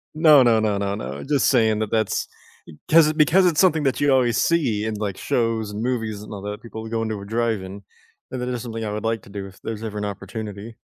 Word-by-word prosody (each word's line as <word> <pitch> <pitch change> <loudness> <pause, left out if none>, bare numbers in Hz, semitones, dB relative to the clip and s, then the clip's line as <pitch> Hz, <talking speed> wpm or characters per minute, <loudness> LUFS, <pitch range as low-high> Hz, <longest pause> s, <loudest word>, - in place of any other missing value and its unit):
No, 155 -4 +7
no, 115 -2 +4
no, 105 -2 0
no, 100 0 -2
no, 70 -1 -6
just 145 -3 +2
saying 110 -4 +3
that 110 -1 -2
that's 110 -2 0 0.6
‘cause 155 -1 +6
because 165 +4 +4
it's 165 -4 +2
something 160 -5 +4
that 135 +1 0
you 145 -1 +3
always 125 -3 +3
see 120 -11 +1
in, 110 - -2
like, 100 -2 -3
shows 115 -3 -1
and 105 +2 -4
movies 110 -4 -2
and 105 - -10
all 100 - -6
that, 105 0 -6
people 110 -1 -8
go 115 0 -2
into 110 -2 -3
a 100 - -9
drive-in, 105 -4 -2 0.5
and 130 - -5
that 125 - -3
is 125 -2 -3
something 115 -2 -5
I 105 - -3
would 105 - -5
like 115 -1 0
to - - -15
do 100 -1 -6
if 95 - -17
there's 110 -1 -5
ever 105 -1 -5
an 105 - -3
opportunity. 105 +2 -7
110 Hz, 240 wpm, -22 LUFS, 105-125 Hz, 0.6 s, No